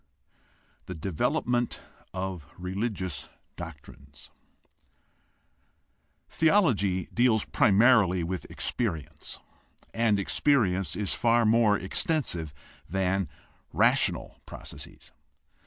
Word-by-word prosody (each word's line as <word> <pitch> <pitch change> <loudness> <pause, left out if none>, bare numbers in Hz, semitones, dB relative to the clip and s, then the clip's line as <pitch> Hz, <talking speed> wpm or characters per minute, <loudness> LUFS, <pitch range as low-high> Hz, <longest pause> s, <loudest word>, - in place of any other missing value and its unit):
THE 90 - -5
DEVELOPMENT 115 +8 -1 0.3
OF 95 -5 -5
RELIGIOUS 95 -4 -3 0.3
DOCTRINES 70 -4 -11 2.0
Theology 120 - +2
deals 120 -3 +3
primarily 105 - +4
with 90 +2 -4
experience, 90 - -4 0.5
and 115 -3 +2
experience 95 - +1
is 105 -3 -1
far 120 0 +3
more 110 -1 +4
extensive 95 - -1 0.4
than 95 0 0 0.4
rational - - +2
processes. - - -9
95 Hz, 75 wpm, -28 LUFS, 90-115 Hz, 2.0 s, primarily